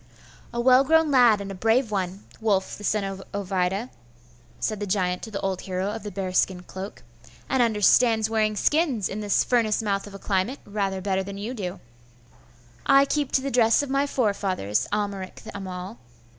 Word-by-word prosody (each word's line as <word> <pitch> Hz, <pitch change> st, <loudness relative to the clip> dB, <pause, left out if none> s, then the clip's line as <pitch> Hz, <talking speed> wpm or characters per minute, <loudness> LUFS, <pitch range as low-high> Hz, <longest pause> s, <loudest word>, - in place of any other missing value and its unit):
'A 235 Hz, -, -4 dB
well 255 Hz, +2 st, +6 dB
grown 320 Hz, +1 st, +3 dB
lad 240 Hz, -5 st, +6 dB
and 200 Hz, 0 st, -6 dB
a -, -, -5 dB
brave 225 Hz, +4 st, +1 dB
one, 190 Hz, -1 st, -3 dB, 0.2 s
Wulf 200 Hz, -4 st, 0 dB
the 210 Hz, -, -11 dB
son 210 Hz, 0 st, +1 dB
of 195 Hz, 0 st, -5 dB
Ovida,' 195 Hz, +3 st, -1 dB, 0.7 s
said 215 Hz, -2 st, -2 dB
the 205 Hz, -, -3 dB
giant 185 Hz, -2 st, 0 dB
to 225 Hz, -, -7 dB
the 200 Hz, -2 st, -4 dB
old 190 Hz, -1 st, -2 dB
hero 190 Hz, +1 st, -2 dB
of 225 Hz, +1 st, -5 dB
the 210 Hz, -, -6 dB
bearskin 185 Hz, -1 st, -1 dB
cloak; 190 Hz, +2 st, -8 dB, 0.4 s
'and 265 Hz, -, +1 dB
understands 220 Hz, 0 st, +4 dB
wearing 215 Hz, -1 st, +1 dB
skins, 275 Hz, -, +1 dB
in 200 Hz, -, -5 dB
this 205 Hz, -2 st, +2 dB
furnace 225 Hz, -3 st, +1 dB
mouth 200 Hz, -1 st, -1 dB
of 200 Hz, -, -10 dB
a -, -, -5 dB
climate, 195 Hz, +7 st, -1 dB
rather 195 Hz, -2 st, -2 dB
better 190 Hz, 0 st, 0 dB
than 195 Hz, +1 st, -7 dB
you 215 Hz, +5 st, -4 dB
do.' 195 Hz, -5 st, -5 dB, 1.1 s
'I 275 Hz, 0 st, +6 dB
keep 290 Hz, -1 st, -1 dB
to 265 Hz, -, +3 dB
the 275 Hz, +1 st, -3 dB
dress 230 Hz, +1 st, +4 dB
of 275 Hz, -, -5 dB
my 275 Hz, +1 st, +2 dB
forefathers, 195 Hz, -, 0 dB
Amalric 200 Hz, -3 st, -3 dB
the -, -, -10 dB
Amal. 190 Hz, +2 st, -6 dB
205 Hz, 185 wpm, -25 LUFS, 190-235 Hz, 1.1 s, well